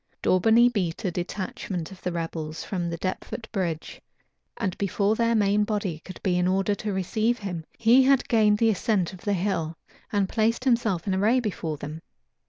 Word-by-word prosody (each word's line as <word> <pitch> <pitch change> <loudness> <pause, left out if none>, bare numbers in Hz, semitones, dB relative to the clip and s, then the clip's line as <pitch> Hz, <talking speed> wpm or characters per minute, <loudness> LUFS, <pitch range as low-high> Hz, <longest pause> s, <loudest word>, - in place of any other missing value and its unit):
Daubeney 225 +6 +5
beat 195 -7 -2
a 185 - +1
detachment 180 -1 -4
of 190 - -12
the 180 - -2
rebels 165 -2 -4
from 175 -3 -3
Deptford 185 +6 -4
bridge; 170 -7 -3 0.6
and 190 -5 -2
before 200 +1 +1
their 230 0 +2
main 205 -1 +3
body 205 -6 -2
could 185 - -9
be 180 -2 +2
in 180 - +2
order 195 +2 +2
to 210 +1 -3
receive 215 +5 0
him, 180 -6 -5
he 235 +3 +6
had 270 0 +3
gained 215 -2 +4
the 225 +1 +4
ascent 195 -3 0
of 185 - -11
the 205 - 0
hill, 170 -4 -1 0.3
and 200 -2 +1
placed 230 +4 +1
himself 230 -9 +1
in 195 - 0
array 215 +7 +3
before 180 -9 -3
them. 150 +3 -7
195 Hz, 180 wpm, -26 LUFS, 175-220 Hz, 0.6 s, he